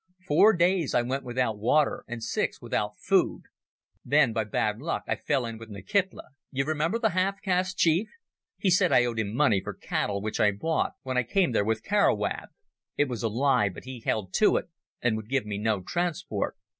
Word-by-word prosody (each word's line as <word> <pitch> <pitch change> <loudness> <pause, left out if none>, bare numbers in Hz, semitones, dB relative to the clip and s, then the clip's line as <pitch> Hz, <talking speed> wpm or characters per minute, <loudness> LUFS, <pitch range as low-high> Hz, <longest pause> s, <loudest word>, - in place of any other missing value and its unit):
Four 200 +9 +6
days 175 -3 +2
I 120 - +3
went 130 +3 -2
without 120 -4 -1
water, 140 +7 +2
and 120 -1 -6
six - - -1
without - - -3
food. - - +1 0.6
Then 140 -5 +3
by 110 -1 -1
bad 105 +1 -1
luck 165 +5 -3
I - - 0
fell 135 -4 -1
in 115 -1 -6
with 115 0 -11
"Nkitla—you 135 - -3
remember, 155 +7 0
the 225 -2 +1
half 190 +2 0
caste 185 -1 0
chief. 170 +6 +2 0.5
He 190 - +1
said 185 0 +4
I 120 - +5
owed 115 -2 -2
him 105 -2 -1
money 120 -8 +3
for - - -6
cattle 100 -1 -2
which 110 +2 -4
I 105 -1 +4
bought 160 +11 -1
when 130 -1 -2
I - - +5
came 180 - +1
there 110 - +2
with 110 0 -1
Carowab. 200 - +1 0.5
It 145 -1 +2
was 120 -3 -4
a 115 - 0
lie, 125 -2 +2
but 90 - -10
he 130 -1 -8
held 105 -4 -2
to - - +4
it, - - -4 0.3
and 120 -2 +2
would 110 0 -8
give 135 -4 0
me 105 -1 -4
no 105 -3 0
transport. 175 - -2
130 Hz, 200 wpm, -27 LUFS, 110-170 Hz, 0.6 s, Four